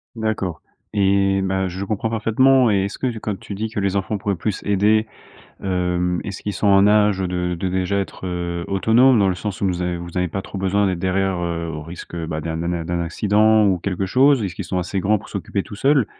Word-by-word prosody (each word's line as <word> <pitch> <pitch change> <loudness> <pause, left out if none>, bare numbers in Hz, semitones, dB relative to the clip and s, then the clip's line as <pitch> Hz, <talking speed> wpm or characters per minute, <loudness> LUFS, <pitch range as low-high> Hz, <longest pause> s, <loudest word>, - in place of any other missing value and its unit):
D'accord 110 -6 -2 0.3
et 95 -1 +2
bah, 95 0 0
je 95 +2 -5
comprends 105 +2 -2
parfaitement 115 +3 +3
et 100 -1 +2
est-ce 100 - -6
que 130 - -1
tu 115 -3 -3
quand 105 -2 -3
tu 100 - -8
dis 110 +3 -2
que 110 - -4
les 100 0 0
enfants 100 +2 -2
pourraient 100 0 -1
plus 105 +2 -3
aider, 105 +2 +3 0.6
hem. 90 -1 0
Est-ce 100 - -7
qu'ils 105 - -2
sont 100 +2 0
en 100 0 +6
âge 105 -1 +4
de 90 -1 -2
de 95 - -1
déjà 95 +2 0
être, 95 -1 -4
heu, 85 -1 -3
autonome 115 +6 +4
dans 100 -2 +3
le 95 - +2
sens 100 +2 -5
où - - +2
nous 90 -1 -1
av 90 0 -1
vous 85 0 -9
avez 90 0 +1
pas 95 +3 -4
trop 95 - -7
besoin 100 +2 +1
d'être 95 -3 -1
derrière, 95 0 0
heu, 85 -1 -3
au 75 -1 -5
risque, 85 +2 -9
bah, 80 -1 -3
d'un 80 +1 -4
d'un 85 +1 -2
d'un 85 -2 -2
d'un 85 0 -1
accident 105 +5 +3
ou 95 -3 +2
quelque 95 +1 -2
chose? 130 +4 +4
Est-ce 95 - -3
qu'ils - - -4
sont 95 - -3
assez 90 +2 -2
grands 105 +3 +2
pour - - -13
s'occuper 100 0 -3
tous - - -10
seuls? 135 +2 +3
95 Hz, 240 wpm, -21 LUFS, 90-105 Hz, 0.6 s, en